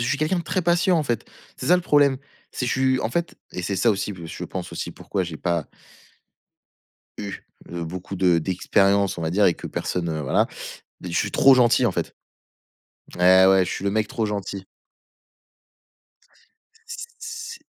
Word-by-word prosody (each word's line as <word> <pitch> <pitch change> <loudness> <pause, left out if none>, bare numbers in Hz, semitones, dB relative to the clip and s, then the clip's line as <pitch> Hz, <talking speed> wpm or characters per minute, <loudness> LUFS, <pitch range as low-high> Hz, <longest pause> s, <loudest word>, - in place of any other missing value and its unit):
je 120 - -1
suis 145 - 0
quelqu'un 165 +4 +1
de 170 - -4
très 180 +2 -1
patient, 175 +1 +3
en 160 - +2
fait. 120 -5 -2 0.3
C'est - - -6
ça 180 - +6
le 180 - -2
problème. 145 -4 +3 0.3
C'est 125 - -2
je - - 0
suis 130 -1 +2
en 110 - -2
fait 170 +6 -2 0.2
et 90 - -4
c'est 100 +2 -2
ça 115 +5 +3
aussi, 100 +1 -2
heu, 85 -3 -9
je - - -6
pense - - -6
aussi, - - -4
pourquoi 95 - -3
j'ai 85 -3 -6
pas 85 -3 -1 1.5
eu, 100 -1 -6 0.3
heu, 85 -1 -4
beaucoup 90 +3 -6
de 90 -2 +3
d'expériences 100 +3 +2
on - - -4
va 80 - -1
dire 100 +3 +3
et 85 - +3
que - - -8
personne, 85 -2 -3
heu, 80 -1 -3
voilà. 65 -3 +2 0.6
Je 90 - -6
suis 100 - 0
trop 135 - +6
gentil 125 0 +4
en 110 - +2
fait. - - -4 1.0
Et, - - -11
ouais, 95 +1 +6
je - - -4
suis 100 - -4
le 100 - +1
mec 110 +1 0
trop 110 - -2
gentil. 100 -2 -4 2.2
C 470 0 -7
c'est 455 +1 -7
100 Hz, 195 wpm, -23 LUFS, 90-135 Hz, 2.2 s, ça